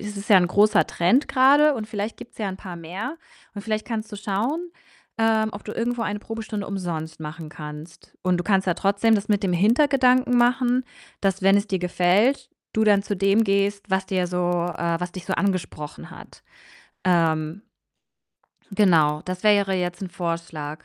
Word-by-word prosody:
es 210 0 -7
ist 200 +3 -7
ja 200 - +9
'n 180 - +2
großer 205 +3 +4
Trend 215 - +2
grade 285 +3 +5
und 220 -4 -5
vielleicht 215 0 -4
gibt's 240 0 -13
ja 210 -3 -2
'n 190 - -5
paar 180 -3 -9
mehr 180 - -6 0.4
und 200 - -7
vielleicht 215 0 -3
kannst 220 -2 -4
du - - -5
schauen, 230 - -2 0.5
ähm, 220 -1 +2
ob 205 - -8
du 215 - -6
irgendwo 240 +1 -2
eine 205 -1 -2
Probestunde 215 -2 -6
umsonst 170 -5 -5
machen 155 +1 -7
kannst. 150 +1 -11
Und 185 -1 +1
du 175 - -1
kannst 195 -2 +2
ja 180 - +3
trotzdem 200 +4 +2
das 205 0 -1
mit 205 -1 +1
dem 185 - 0
Hintergedanken 250 - +3
machen, 250 +1 +2 0.4
dass 195 -1 0
wenn 195 +1 +5
es 200 - -3
dir 190 -3 -1
gefällt, 195 +9 +2 0.2
du 220 - +1
dann 205 -2 +4
zu 205 - -3
dem 195 +4 +3
gehst, 200 0 0
was 190 0 0
dir 185 -2 0
so 175 -1 0
äh, 170 -1 0
was 180 0 -4
dich 185 -1 -9
so 190 - -1
angesprochen 165 -6 -3
hat. - - -14 0.6
Ähm 165 +1 +1 1.1
genau, 165 -7 +3
das 185 0 -5
wäre 200 -2 +3
jetzt 180 0 -3
'n 190 - -4
Vorschlag. 165 -3 -5
200 Hz, 185 wpm, -23 LUFS, 175-220 Hz, 1.1 s, ja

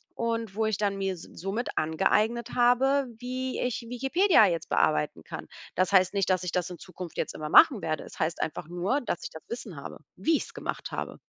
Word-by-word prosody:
und 230 -3 -2
wo 220 0 +1
ich 215 -3 0
dann 200 -2 0
mir 195 -1 -1
somit 195 +8 -5
angeeignet 215 +9 +1
habe, 260 +3 +4
wie 255 +1 -3
ich 250 -2 -1
Wikipedia 270 - +4
jetzt 170 -3 -2
bearbeiten 75 -1 +1
kann. - - -8 0.3
Das 185 +1 +2
heißt 185 -2 +5
nicht, 195 -2 +1
dass 185 -1 +2
ich 180 - -2
das 180 0 -1
in 180 - -8
Zukunft 180 -1 -9
jetzt - - -2
immer 155 0 -5
machen 255 - +7
werde. 155 -2 -2
Es - - -12
heißt 160 +1 -1
einfach 155 +1 -3
nur, 185 +11 0
dass 175 -8 -3
ich - - -4
das 160 - -10
Wissen 235 -6 -6
habe, 140 - -8 0.2
wie 265 - +2
ich's - - -7
gemacht - - -5
habe. - - -5
200 Hz, 205 wpm, -28 LUFS, 175-245 Hz, 0.3 s, machen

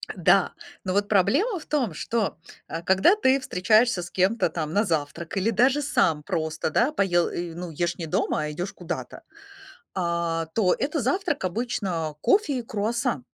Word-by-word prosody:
Да, - - +3 0.3
но 185 - -1
вот 205 +1 +1
проблема 310 - +2
в - - -13
том, 255 - 0
что, 220 +6 -2 0.3
а 165 - -5
когда 190 - +4
ты 270 -8 +3
встречаешься 215 0 +2
с 175 - -7
кем-то 190 0 +1
там 155 -2 -4
на 205 - +3
завтрак 165 +2 -3
или 195 +4 +1
даже 255 +7 +3
сам 160 - +1
просто, 160 0 -2
да, 240 - +2
поел, 175 - +2
э, 170 -1 -5
ну, 175 -1 -6
ешь 170 +2 -2
не 165 - -4
дома, 155 - 0
а 150 - -3
идёшь 175 +6 -4
куда-то, 175 -1 -6 0.7
а, 170 -2 -1
то 195 -5 +3
это 300 +2 -1
завтрак 290 - -1
обычно 185 -6 -2
кофе 365 -10 +2
и - - -3
круассан. 215 - -2
190 Hz, 170 wpm, -25 LUFS, 170-240 Hz, 0.7 s, когда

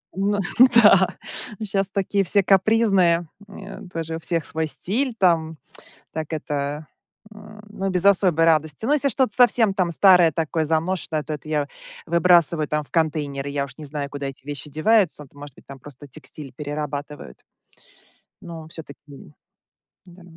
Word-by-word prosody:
М, 200 +2 0 0.2
ну 255 - +9
да. 195 -3 +6 0.5
Н, 215 - -4
щас 195 -1 -1
такие 200 0 -1
все 195 +2 +2
капризные. 190 -4 +3 0.2
М, 200 - -13 0.3
э, - - -14
тоже 165 -1 -5
у - - -5
всех 165 0 -2
свой 160 0 -3
стиль 240 - -2
там. 165 -4 +1 0.6
Так 160 0 -6
это 145 0 -4 0.5
м, 210 0 -14
ну 195 -2 -4
без 180 -1 0
особой 180 -5 +4
радости. 155 +3 +1
Но 285 - +1
если 285 -2 +2
что-то 255 -4 0
совсем 235 -5 +4
там 180 -3 0
старое, 180 -1 +5
такое 160 +1 -2
заношенное, 160 0 -2
то 150 +2 -5
это 150 - -10
я 150 -2 -1 0.4
выбрасываю 170 -2 +3
там 150 0 -1
в - - -19
контейнеры, 145 -4 -2
я 140 0 -2
уж 140 - -12
не 155 - -9
знаю, 145 0 -5
куда 140 -1 -6
эти 135 -1 -9
вещи 145 0 -6
деваются. 170 -1 +1
Т. 135 - -27
Может 145 -2 -11
быть, - - -19
там 135 0 -11
просто 145 +1 -13
текстиль 145 -1 -10
перерабатывают. 145 - -6 1.1
Но 165 -2 -9
всё-таки. 160 -3 -12 1.1
Да. 180 +1 -16
165 Hz, 165 wpm, -22 LUFS, 150-195 Hz, 1.1 s, ну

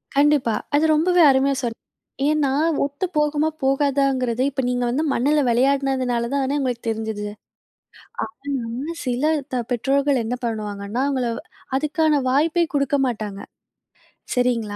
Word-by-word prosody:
கண்டிப்பா. 285 -6 +3 0.2
அது 310 +2 +3
ரொம்பவே 355 +3 +3
அருமையா 270 +1 +2
சொல் 230 -1 -3 0.5
ஏன்னா 300 -3 +2 0.4
ஒத்து 285 +6 -3
போகுமா 300 +1 +2
போகாதாங்கிறது, 270 -3 +1
இப்போ 265 -1 -2
நீங்க 245 0 0
வந்து 285 +6 0
மண்ணுல 295 +5 +2
வெளையாடினதுனால 255 -1 +1
தான 280 +1 0
உங்களுக்கு 250 -3 -2
தெரிஞ்சுது. 220 -1 -3 1.0
ஆனா 275 0 -5
சில 250 +3 -1 0.3
த 245 -2 0
பெற்றோர்கள் 270 +1 +1
என்ன 245 +3 -2
பண்ணுவாங்கன்னா, 210 0 -3
அவங்கள 260 -3 0 0.5
அதுக்கான 305 0 +1
வாய்ப்பே 320 +5 +2
குடுக்க 280 0 +2
மாட்டாங்க. 210 -4 -5 0.9
சரிங்களா. 235 -4 0
265 Hz, 120 wpm, -22 LUFS, 235-285 Hz, 1.0 s, கண்டிப்பா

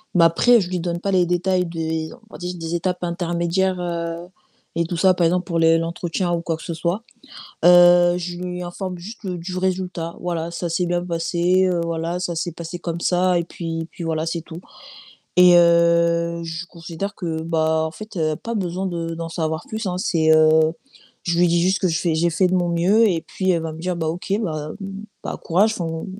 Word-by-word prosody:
Mais 170 - +6
après, 235 +7 +5
je 180 - -4
lui 180 -1 -2
donne 170 0 -2
pas 195 +1 -2
les 180 -2 +3
détails 180 +1 +1
des 160 -1 -3
on 245 - -15
va - - -8
dire, 180 0 -4
des 165 0 -4
étapes 180 +1 -2
intermédiaires, 175 +2 0
heu 170 0 -4 0.5
et 170 0 +1
tout 170 0 -4
ça. 185 +1 +5
Par 175 -2 +1
exemple 180 +2 +1
pour 170 -2 -1
les 165 0 +5
l'entretien 170 +2 -2
ou 170 - 0
quoi 165 -1 -2
que - - -12
ce 170 - -4
soit. 170 +7 -2 0.6
Heu, 175 0 +7
je 175 0 -5
lui 180 0 -5
informe 180 +1 -5
juste 210 +3 -9
du 180 0 -4
résultat. 180 -3 -2
Voilà, 170 -1 -3
ça 170 0 -4
s'est 175 +2 0
bien 175 0 -1
passé, 175 +2 +1
heu, 175 -2 +1
voilà, 170 +1 -2
ça 175 -1 -2
s'est 170 0 -2
passé 170 +1 -7
comme 170 -1 -4
ça 180 0 +2
et 170 - -1
puis 165 -1 -5
et - - -5
puis 170 - -9
voilà, 160 0 -1
c'est 165 0 -3
tout 165 +1 -10 0.8
et 180 -1 +8
heu, 170 0 +3
je 165 +2 -5
considère 170 +4 -6
que, 165 -4 -3
bah 160 -1 +1
en - - -4
fait, 215 +1 -9 0.2
pas 230 0 -4
besoin 185 -1 -2
de 165 -2 -3
d'en 165 0 -5
savoir 160 -1 -2
plus, 220 -1 -4
hein. 180 -1 -1
C'est 160 -5 +1
heu, 155 0 +5 0.5
je 170 -1 0
lui 175 0 +5
dis 170 0 +2
juste 190 +1 +2
que 185 - +2
je 160 -2 0
fais 170 -3 0
j'ai 170 +2 +2
fait 180 +3 +2
de 185 - 0
mon 175 -1 +1
mieux 195 +7 +4
et 165 -3 0
puis 190 -1 -1
elle 170 -2 +1
va 160 - -4
me 155 - -9
dire: 180 0 -2
«Bah 160 -2 -2
OK, 180 +4 -4
bah 155 -4 -3 0.5
bah - - -4
courage, 200 +6 +3
enfin, 165 -2 -3
170 Hz, 220 wpm, -21 LUFS, 165-180 Hz, 0.8 s, et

